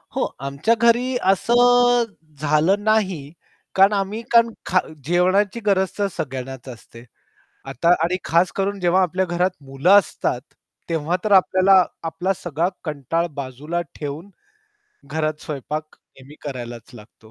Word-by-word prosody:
हो - - +1 0.2
आमच्या 140 +11 0
घरी 240 +2 +3 0.2
असं 245 +3 +4 0.4
झालं 155 +7 +2
नाही, 190 -10 0 0.4
कारण 195 +2 +5
आम्ही 200 +2 -2
कारण 235 0 +5 0.2
खा 185 - +3 0.3
जेवणाची 185 +6 +2
गरज 190 -2 +1
तर 205 -1 +1
सगळ्यांनाच 130 -2 -6
असते. 115 -1 -12 0.6
आता 165 +8 -1 0.2
आणि 180 +2 0
खास 170 +2 +2
करून 200 +1 -1
जेव्हा 180 +1 +3
आपल्या 185 +1 0
घरात 175 +2 0
मुलं 135 +6 0
असतात, 155 -8 -2 0.5
तेव्हा 165 +1 -1
तर 215 - 0
आपल्याला 190 0 +5 0.2
आपला 165 +4 -1
सगळा 170 -1 -2 0.2
कंटाळ 155 +2 -2
बाजूला 140 +5 -4 0.2
ठेवून 150 +6 -6 0.7
घरात 155 +1 -3
स्वयंपाक 150 +2 -5
नेहमी 135 +2 -18
करायलाच 120 -3 -7
लागतो. 110 0 -16
175 Hz, 130 wpm, -21 LUFS, 145-195 Hz, 0.7 s, कारण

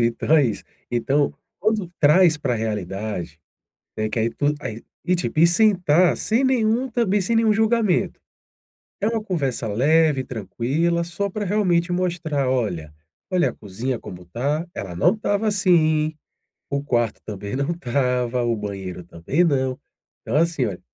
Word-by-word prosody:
Então, 160 +6 +3
é 145 - +5
isso. 105 -4 -3 0.3
Então, 135 +5 +1 0.3
quando 210 -3 0
traz 160 +2 +5
para 135 -4 -1
a - - -1
realidade, 100 -5 -4 0.6
né, 110 0 -1
que 115 - -2
aí 115 +1 +1
tudo 145 +4 0
aí 115 -5 -6 0.2
e, 180 - +3
tipo, 170 -3 -2
e 170 - +8
sentar 180 -3 +4
sem 230 +5 +1
nenhum 250 0 +2
também 215 -4 +1
sem 230 +5 0
nenhum 225 -1 +4
julgamento. 220 -3 +1 0.8
É 205 - 0
uma 225 -1 0
conversa 140 - -2
leve, 145 +5 +3
tranquila, 135 - -1
só 200 +4 -3
pra, 210 +2 -3
realmente, 180 -3 +1
mostrar, 165 -7 -1
"Olha, 90 -12 -2 0.4
olha 180 -2 +2
a - - -11
cozinha 115 +6 -4
como 90 -4 -10
tá. 140 - -2
Ela 90 -3 -6
não 90 - +4
estava 215 0 -1
assim. 160 -6 +2 0.6
O 140 0 -1
quarto 120 -5 0
também 100 +1 -5
não 140 +4 -1
estava. 125 -5 0
O 120 -1 +1
banheiro 95 -4 -6
também 85 - -1
não. 130 -5 +1 0.4
Então, 115 - -4
assim, 165 -5 +2
olha 95 -4 -4
150 Hz, 160 wpm, -22 LUFS, 115-180 Hz, 0.8 s, e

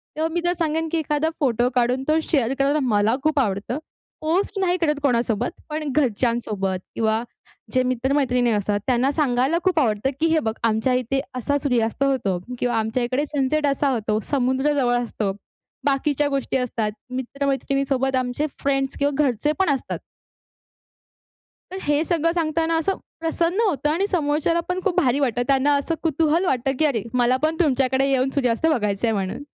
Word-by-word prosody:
तेव्हा 315 +1 0
मी 345 - 0
तर 350 - +3
सांगेन 325 0 0
की 335 - +1
एखादा 310 0 0
फोटो 245 -4 +2
काढून 250 +1 +1
तो 310 +1 +3
शेअर 265 -6 +2
करायला 280 +2 +2
मला 220 -2 +2
खूप 310 -1 +2
आवडतं. 210 +1 -1 0.4
पोस्ट 360 +6 0
नाही 365 -1 +2
करत 300 -3 +1
कोणासोबत 240 -3 +1 0.2
पण 305 -1 -3
घरच्यांसोबत 230 -7 0 0.2
किंवा 220 0 +1 0.5
जे 255 -1 +3
मित्र-मैत्रिणी 255 -1 +1
असतात 205 -1 0
त्यांना 255 +1 +2
सांगायला 275 0 +1
खूप 370 -4 +2
आवडतं, 220 -2 +1
की 330 - +3
हे 320 -1 +3
बघ, 220 -7 -2
आमच्या 225 +3 +2
इथे 255 +2 0 0.2
असा 285 +4 0
सूर्यास्त 245 -2 +1
होतो 245 -10 0 0.2
किंवा 245 -1 0
आमच्या 220 +2 0
इकडे 255 +4 0
सनसेट 290 +2 +1
असा 280 0 +1
होतो. 215 -2 0
समुद्र 265 +1 +1
जवळ 245 -2 +2
असतो. 215 -4 -2 0.5
बाकीच्या 285 +1 +1
गोष्टी 275 -1 -1
असतात, 230 -4 -1 0.2
मित्रमैत्रिणीसोबत 270 0 -1
आमचे 255 +4 -1
फ्रेंड्स 270 -1 0
किंवा 285 0 +2
घरचेपण 295 - +1
असतात. 265 - -5 1.7
तर 375 - -5
हे 295 +1 +2
सगळं 330 -1 +1
सांगताना 325 0 0
असं 380 +4 0 0.2
प्रसन्न 335 +4 0
होतं 295 -5 0
आणि 350 +6 +1
समोरच्याला 315 -1 +1
पण 360 0 0
खूप 380 -4 0
भारी 260 +1 +2
वाटतं. 245 -4 0
त्यांना 275 +1 +3
असं 305 +4 -2
कुतूहल 325 +2 +2
वाटतं, 265 -4 +1
की 315 - +4
अरे 245 -9 0
मला 250 0 +3
पण 315 +1 +2
तुमच्याकडे 270 -3 +2
येऊन 265 0 +2
सूर्यास्त 250 0 +1
बघायचंय 225 -6 +1
म्हणून. 195 +5 -3
270 Hz, 160 wpm, -23 LUFS, 245-305 Hz, 1.7 s, की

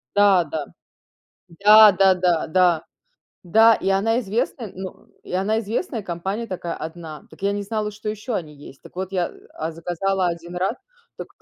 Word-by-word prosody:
да-да. 175 -7 +3 0.8
Да, 210 +4 +7
да-да, 180 -3 +3
да. 175 -1 +3 0.6
Да, 225 +6 +5
и - - -3
она 225 +5 +2
известная, 225 0 -3
ну 185 0 -9 0.2
и - - -11
она 205 +4 +1
известная 230 - -3
компания 190 +5 -4
такая 175 -2 -4
1. 160 -1 -8
Так 160 - -17
я 200 - +1
не 205 0 -3
знала, 210 +1 -3
что 210 +1 -7
еще 215 +3 -4
они 155 -5 -4
есть. 140 -1 -14
Так - - -16
вот, 190 +1 -4
я, 180 -2 -1 0.2
а, 160 +1 -4
заказала 180 +3 -1
1 170 +1 -5
раз, 190 +5 0 0.4
так - - -8
190 Hz, 165 wpm, -22 LUFS, 170-210 Hz, 0.8 s, Да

